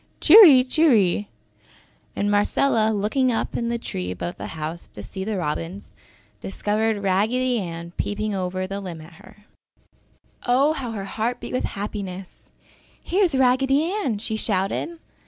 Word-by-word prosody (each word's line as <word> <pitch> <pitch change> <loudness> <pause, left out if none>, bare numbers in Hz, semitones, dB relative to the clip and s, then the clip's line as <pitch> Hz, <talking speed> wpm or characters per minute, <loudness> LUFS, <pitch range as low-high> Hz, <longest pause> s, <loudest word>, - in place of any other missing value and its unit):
Cheery! 320 - +9
Cheery!" 230 - +2 0.9
And 205 0 0
Marcella 215 +2 +2
looking 220 +5 +1
up 225 - -2
into 235 -1 -1
the 235 - -1
tree 90 - -5
above 90 -1 -5
the - - -6
house 160 +2 -5
to 105 - -11
see 190 - -7
the 210 0 -3
robins, 170 +4 -4 0.5
discovered 210 - -1
Raggedy 230 +6 +1
Ann 170 -2 -6
peeping 210 +1 -2
over 185 -1 -2
the 195 +1 -5
limb 175 -4 -7
at 160 +3 -14
her. 210 - -18 1.0
Oh, 270 +5 +3
how 255 -6 -5
her 200 -3 -5
heart 225 +4 -3
beat - - -8
with 255 - 0
happiness. 195 -2 -7 0.5
"Here 390 +3 0
is 335 -7 +1
Raggedy 270 +5 +2
Ann," 385 - -1
she 220 +1 -4
shouted. 210 - -1
210 Hz, 150 wpm, -23 LUFS, 190-255 Hz, 1.0 s, Cheery